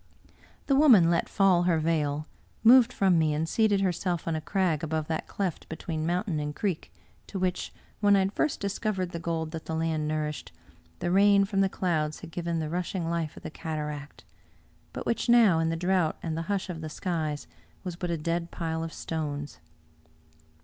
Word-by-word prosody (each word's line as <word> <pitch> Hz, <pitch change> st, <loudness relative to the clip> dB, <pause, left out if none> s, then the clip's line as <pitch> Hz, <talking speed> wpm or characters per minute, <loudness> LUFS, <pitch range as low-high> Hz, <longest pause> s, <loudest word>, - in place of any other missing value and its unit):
The 275 Hz, -, +2 dB
woman 235 Hz, -, +7 dB
let 170 Hz, -, +1 dB
fall 185 Hz, -3 st, +3 dB
her 165 Hz, -, +3 dB
veil, 155 Hz, -2 st, 0 dB, 0.4 s
moved 245 Hz, +1 st, +7 dB
from 190 Hz, -7 st, +3 dB
me, 155 Hz, -2 st, +2 dB
and 160 Hz, +2 st, -1 dB
seated 205 Hz, +1 st, +2 dB
herself 180 Hz, -2 st, -1 dB
on 165 Hz, -, 0 dB
a 155 Hz, -, -2 dB
crag 175 Hz, -3 st, 0 dB
above 160 Hz, -1 st, -1 dB
that 160 Hz, -, -2 dB
cleft 190 Hz, -5 st, -3 dB
between 160 Hz, -1 st, -3 dB
mountain 180 Hz, -1 st, 0 dB
and 150 Hz, 0 st, -4 dB
creek, 190 Hz, -6 st, -2 dB, 0.4 s
to 195 Hz, -, -6 dB
which, 185 Hz, -1 st, -1 dB, 0.3 s
when 205 Hz, -1 st, +5 dB
I -, -, +4 dB
had 190 Hz, +1 st, -1 dB
first 305 Hz, +5 st, 0 dB
discovered 200 Hz, -2 st, -2 dB
the 170 Hz, -, -5 dB
gold 165 Hz, -1 st, -2 dB
that 160 Hz, -1 st, -6 dB
the 160 Hz, -, -2 dB
land 160 Hz, -1 st, -1 dB
nourished, 150 Hz, -1 st, -3 dB, 0.5 s
the 175 Hz, -, -2 dB
rain 200 Hz, +1 st, +5 dB
from 195 Hz, -1 st, 0 dB
the 195 Hz, -, +3 dB
clouds 155 Hz, -5 st, -1 dB
had 170 Hz, -, -9 dB
given 170 Hz, 0 st, -2 dB
the 160 Hz, -1 st, -2 dB
rushing 175 Hz, +1 st, -2 dB
life 165 Hz, -2 st, -2 dB
of -, -, -11 dB
the -, -, -6 dB
cataract; 150 Hz, -2 st, -5 dB, 0.7 s
but -, -, -6 dB
which 235 Hz, -, -1 dB
now, 225 Hz, -8 st, +6 dB
in 165 Hz, 0 st, +1 dB
the 165 Hz, -, -1 dB
drought 175 Hz, -1 st, +1 dB
and 160 Hz, -2 st, -2 dB
the 165 Hz, -, -2 dB
hush 200 Hz, -2 st, -1 dB
of 170 Hz, -3 st, -6 dB
the 155 Hz, -, -5 dB
skies, 155 Hz, -4 st, -3 dB, 0.4 s
was 180 Hz, -3 st, -4 dB
but 175 Hz, 0 st, -4 dB
a 170 Hz, -, 0 dB
dead 170 Hz, +2 st, -2 dB
pile 160 Hz, -1 st, -3 dB
of 165 Hz, -, -5 dB
stones. 145 Hz, -4 st, -4 dB
170 Hz, 195 wpm, -28 LUFS, 160-190 Hz, 0.7 s, woman